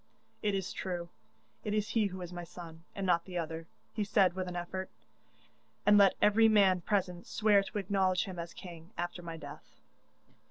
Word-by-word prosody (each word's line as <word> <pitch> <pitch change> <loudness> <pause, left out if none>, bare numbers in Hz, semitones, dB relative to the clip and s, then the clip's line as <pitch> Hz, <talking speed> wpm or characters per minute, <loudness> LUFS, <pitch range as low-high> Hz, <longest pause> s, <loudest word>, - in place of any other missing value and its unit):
'It 205 -2 +1
is 190 -1 -3
true; 175 -2 -4 0.5
it 210 0 -1
is 210 0 0
he 220 -3 +2
who 185 -1 -6
is 175 0 -7
my 175 0 -5
son, 165 -1 -10
and 195 - -2
not 170 -2 +2
the 180 -2 -5
other,' 165 0 -4 0.3
he 215 - -1
said 195 -3 +3
with 185 0 -3
an 180 - -5
effort, 185 +2 -4 1.0
'and 210 - +7
let 200 -1 +6
every 220 +2 +5
man 195 -4 +5
present 180 -2 -1
swear 210 -2 +4
to 200 +2 -6
acknowledge 190 -2 +2
him 185 -4 -6
as 170 0 -5
king, 170 -2 -10
after 175 0 -3
my 165 -1 -6
death. 145 -2 -11
185 Hz, 190 wpm, -32 LUFS, 175-200 Hz, 1.0 s, and